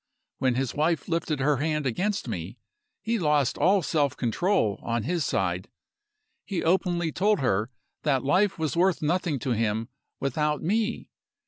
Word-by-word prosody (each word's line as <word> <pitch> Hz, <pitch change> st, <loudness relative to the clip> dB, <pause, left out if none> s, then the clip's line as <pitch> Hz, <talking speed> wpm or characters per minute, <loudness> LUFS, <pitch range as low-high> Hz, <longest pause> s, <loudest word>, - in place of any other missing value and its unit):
When 130 Hz, -2 st, +2 dB
his 130 Hz, -1 st, -1 dB
wife 155 Hz, 0 st, 0 dB
lifted 165 Hz, -4 st, -1 dB
her 145 Hz, +1 st, +3 dB
hand 150 Hz, +1 st, -1 dB
against 190 Hz, -, -1 dB
me, 95 Hz, +1 st, -5 dB, 0.5 s
he 230 Hz, 0 st, 0 dB
lost 150 Hz, -6 st, +2 dB
all 190 Hz, 0 st, +4 dB
self 145 Hz, -4 st, +1 dB
control, 125 Hz, -, +1 dB
on 115 Hz, -1 st, -1 dB
his 170 Hz, +5 st, 0 dB
side. 90 Hz, -6 st, -1 dB, 0.7 s
He 190 Hz, -4 st, -3 dB
openly 175 Hz, -1 st, +1 dB
told 205 Hz, +5 st, +2 dB
her 110 Hz, -3 st, +1 dB, 0.3 s
that 135 Hz, -4 st, +1 dB
life 185 Hz, +9 st, +2 dB
was 155 Hz, -5 st, -1 dB
worth 180 Hz, -1 st, +2 dB
nothing 165 Hz, -1 st, 0 dB
to 135 Hz, 0 st, -3 dB
him 110 Hz, 0 st, 0 dB, 0.3 s
without 150 Hz, +2 st, -1 dB
me. 220 Hz, +6 st, -1 dB
150 Hz, 150 wpm, -26 LUFS, 125-180 Hz, 0.7 s, all